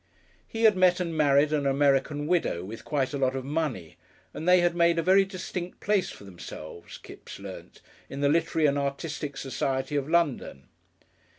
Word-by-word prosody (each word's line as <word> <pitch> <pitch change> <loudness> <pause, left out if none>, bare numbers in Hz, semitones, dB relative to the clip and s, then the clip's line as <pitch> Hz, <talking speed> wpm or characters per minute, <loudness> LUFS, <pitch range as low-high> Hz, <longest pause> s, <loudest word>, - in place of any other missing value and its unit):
He 225 0 -4
had 215 -3 +6
met 185 -1 +4
and 170 -2 -3
married 145 0 +3
an 145 -2 +1
American 140 +1 +1
widow 160 - 0
with 110 +4 -8
quite 140 -2 -1
a 140 - -2
lot 130 0 +1
of 130 -1 -4
money, 140 - -3 0.4
and 165 - -2
they 180 0 +6
had 175 0 +1
made 170 0 +3
a 165 - +1
very 195 +2 +5
distinct 185 -2 -6
place 200 -3 +1
for - - -11
themselves, 85 -3 -10
Kipps - - -12
learnt, - - -10 0.3
in 135 - -7
the 140 - +3
literary 160 +1 +1
and 145 0 +1
artistic 140 0 -4
society 135 +1 -2
of 145 0 -1
London. 150 - -1
150 Hz, 180 wpm, -27 LUFS, 135-170 Hz, 0.4 s, had